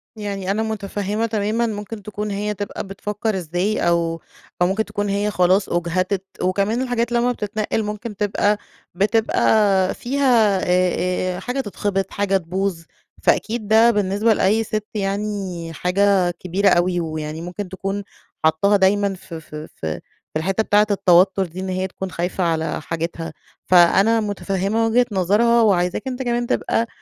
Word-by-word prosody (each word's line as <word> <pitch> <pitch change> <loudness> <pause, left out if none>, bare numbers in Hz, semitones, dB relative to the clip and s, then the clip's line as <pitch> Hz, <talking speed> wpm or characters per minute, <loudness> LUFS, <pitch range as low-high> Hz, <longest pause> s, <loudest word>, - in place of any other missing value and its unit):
يعني 200 -3 -3
أنا 215 +2 0
متفهمة 210 0 -2
تمامًا، 220 +1 0
ممكن 210 0 -6
تكون 210 0 -4
هي 210 +1 -2
تبقى 205 0 -5
بتفكر 210 +1 -3
إزاي 180 +5 -1
أو 165 -1 +1 0.4
أو 175 - +5
ممكن 215 +3 0
تكون 205 0 -3
هي 205 +1 0
خلاص 185 +1 +2
أُجهدت، 185 +3 -1 0.2
وكمان 200 +6 +1
الحاجات 245 -2 -1
لمّا 240 +1 +2
بتتنقل 215 0 -2
ممكن 210 +1 -5
تبقى 205 +1 +1 0.4
بتبقى 205 -1 +2
فيها، 240 -7 +2
آآ 180 0 +1
آآ - - -5
حاجة 250 +3 -3
تتخبط، 195 -3 -2
حاجة 195 -1 +1
تبوظ، 185 0 -2 0.4
فأكيد 220 -2 +1
ده 225 +2 +6
بالنسبة 205 +2 +2
لأي 215 +2 +2
سِت 215 -1 -3
يعني 195 -4 -3
حاجة 185 +1 +2
كبيرة 185 +3 0
أوي، 175 0 +2
ويعني 155 -1 -4
ممكن 180 +3 -6
تكون 195 +2 -4 0.4
حطاها 200 +6 +4
دايمًا 200 +1 +2
ف 185 -2 -13
ف 160 -1 -9
ف 150 - -8 0.5
في 155 - 0
الحتّة 195 +5 0
بتاعة 210 0 +3
التوتر 190 0 +4
دي، 175 +1 -9
إن 190 0 -4
هي 185 0 -1
تكون 190 0 -6
خايفة 180 +2 -2
على 160 -1 -1
حاجتها. 165 0 -4 0.3
فأنا 190 +5 +5
متفهمة 205 +1 -1
وجهة 245 +2 +3
نظرها 210 +5 +3
وعايزاك 185 0 +1
أنتَ 260 0 -4
كمان 240 0 -1
تبقى 230 0 0
200 Hz, 150 wpm, -21 LUFS, 180-215 Hz, 0.5 s, ده